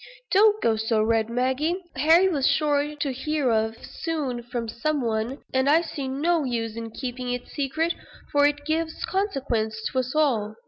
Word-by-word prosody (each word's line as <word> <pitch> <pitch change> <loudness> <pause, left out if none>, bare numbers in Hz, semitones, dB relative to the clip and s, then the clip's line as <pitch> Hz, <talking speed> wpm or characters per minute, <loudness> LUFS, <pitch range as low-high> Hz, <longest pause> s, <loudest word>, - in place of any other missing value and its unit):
Don't 420 +2 +5
go 225 -1 +3
so 220 0 +1
red, 225 0 +1
Maggie. 260 +7 0 0.2
Harry 330 +5 +5
was 290 -8 +1
sure 295 -1 +1
to 285 -2 -2
hear 280 0 0
of 220 0 +1
it - - -13
soon 290 -7 -3
from 235 -1 -4
some 295 +7 -1
one, 230 +2 -2
and 260 +1 +2
I 320 +3 +5
see 280 -5 -5
no 310 +5 +1
use 230 -4 -2
in 230 0 -5
keeping 250 +1 -5
it 245 0 -4
secret, 315 +4 -1 0.4
for 285 0 +5
it 290 0 -2
gives 320 +1 -1
consequence 260 - -1
to 260 - 0
us 255 +2 -3
all." 230 -9 +1
270 Hz, 180 wpm, -25 LUFS, 235-310 Hz, 0.4 s, Don't